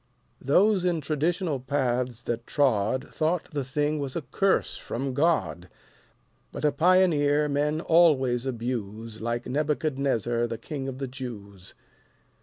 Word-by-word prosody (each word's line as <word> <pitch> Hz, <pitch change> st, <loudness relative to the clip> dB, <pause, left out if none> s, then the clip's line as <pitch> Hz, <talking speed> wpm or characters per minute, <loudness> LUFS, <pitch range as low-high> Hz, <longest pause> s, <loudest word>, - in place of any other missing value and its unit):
Those 190 Hz, +8 st, +3 dB
in 175 Hz, -2 st, +1 dB
traditional 155 Hz, +1 st, -1 dB
paths 125 Hz, -3 st, -1 dB
that 120 Hz, 0 st, -4 dB
trod 130 Hz, -1 st, +1 dB
Thought 160 Hz, +2 st, -1 dB
the 145 Hz, -2 st, -1 dB
thing 150 Hz, +3 st, -1 dB
was 140 Hz, -2 st, -4 dB
a 165 Hz, -, -2 dB
curse 190 Hz, +9 st, +1 dB
from 130 Hz, +3 st, -4 dB
God, 140 Hz, -, 0 dB, 0.8 s
But -, -, -4 dB
a 150 Hz, -, +4 dB
Pioneer 155 Hz, -4 st, +3 dB
men 150 Hz, +2 st, 0 dB
always 135 Hz, -8 st, +3 dB
abuse 115 Hz, -3 st, -4 dB
Like 120 Hz, +1 st, -2 dB
Nebuchadnezzar 135 Hz, -5 st, 0 dB
the 115 Hz, -1 st, -4 dB
King 135 Hz, +3 st, -6 dB
of 130 Hz, -1 st, -5 dB
the 135 Hz, 0 st, -4 dB
Jews. 105 Hz, -8 st, -9 dB
135 Hz, 130 wpm, -26 LUFS, 120-155 Hz, 0.8 s, a